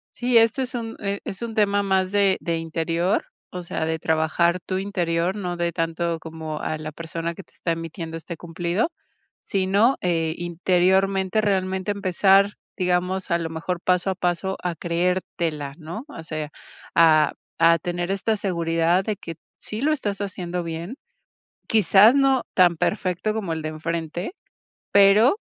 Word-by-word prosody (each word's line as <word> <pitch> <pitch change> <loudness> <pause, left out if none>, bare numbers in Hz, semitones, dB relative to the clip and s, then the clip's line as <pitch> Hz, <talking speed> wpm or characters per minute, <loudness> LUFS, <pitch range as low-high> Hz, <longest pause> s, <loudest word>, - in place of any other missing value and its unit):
Sí, 245 -1 +2
esto 230 +4 +4
es 255 0 -4
un 225 -2 -5
e 200 -1 -2
es 195 - -7
un 230 -2 -5
tema 205 -1 +2
más 190 -1 +1
de 200 -2 +3
de 165 -1 -1
interior, 165 +3 -1 0.2
o 180 0 -6
sea, 160 -2 -3
de 160 0 -1
trabajar 160 +3 +1
tu 185 +1 -3
interior, 180 -2 -1
no 180 -3 -3
de 170 0 -1
tanto, 165 0 -2
como 160 -1 -6
a 155 - -2
la 155 0 -6
persona 165 +1 -4
que 195 - -10
te - - -33
está 170 - -2
emitiendo 165 0 -5
este 165 +1 -7
cumplido. 175 - -2 0.5
Si 190 -1 -1
no, 215 +7 +4
eh, 165 -3 0
interiormente, 185 +3 +1
realmente 190 -1 0
empezar 195 +1 +3 0.2
digamos, 180 0 0
a 170 - +4
lo 165 -1 -4
mejor 165 +2 -3
paso 180 +1 +1
a 190 - -1
paso, 180 +2 -1
a 180 -1 -1
creértela, 170 -4 -2
¿no? 170 +8 -7
O 165 - -9
sea, 155 -2 -5 0.4
a 160 -2 +5 0.3
a 165 0 +6
tener 175 +2 -3
esta 215 +3 0
seguridad, 170 -1 +1
de 215 +1 -2
que, 165 -2 -8 0.2
sí 215 +2 -5
lo 305 +3 +3
estás 205 -9 -3
haciendo 180 -3 -4
bien. 170 +8 -5 0.7
Quizás, 215 +2 +6
no 270 -2 +3
tan 175 -3 +4
perfecto 190 +3 -1
como 205 -6 -3
el 160 - -4
de 155 - -2
enfrente, 165 - -4 0.6
pero, 205 - +6
180 Hz, 165 wpm, -23 LUFS, 165-200 Hz, 0.7 s, a